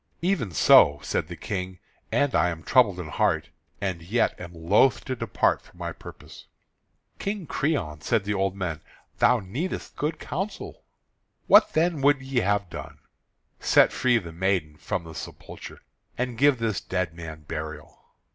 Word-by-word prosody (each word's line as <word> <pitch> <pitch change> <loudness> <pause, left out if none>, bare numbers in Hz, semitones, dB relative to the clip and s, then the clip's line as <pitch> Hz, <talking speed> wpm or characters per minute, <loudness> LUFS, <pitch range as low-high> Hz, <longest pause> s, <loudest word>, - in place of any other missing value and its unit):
"Even 175 - +1
so," 75 -3 +6
said - - -1
the 85 - -7
King, 95 -1 -4 0.3
"and 145 -2 +2
I 90 - +3
am 80 -2 -6
troubled 105 -5 +3
in 90 - -5
heart, - - 0 0.3
and 95 -4 -3
yet 105 +8 +1
am 85 -1 -8
loath 90 +10 +2
to 130 - -2
depart 115 -4 +1
from - - -21
my - - -4
purpose." - - -12 0.7
"King 200 -2 -3
Creon," 120 - -2
said 100 - +1
the 105 +1 -1
old 95 -1 0
men, 85 -5 -4 0.4
"thou 125 -1 +5
needest 125 - -5
good 150 +2 -2
counsel." 195 +6 -5 0.6
"What, - - +6
then, 160 -2 +1
would 145 0 +4
ye 130 -1 -1
have 100 -2 +1
done?" 85 - -8 0.6
"Set - - +5
free 125 -1 +3
the 85 -7 -5
maiden 90 -4 0
from 85 - -3
the 80 -1 -10
sepulchre, - - -9 0.3
and 125 -1 -2
give 140 +2 +4
this 115 -3 -1
dead 90 -3 -2
man 80 -2 -8
burial." 75 0 -7
100 Hz, 160 wpm, -26 LUFS, 85-130 Hz, 0.7 s, so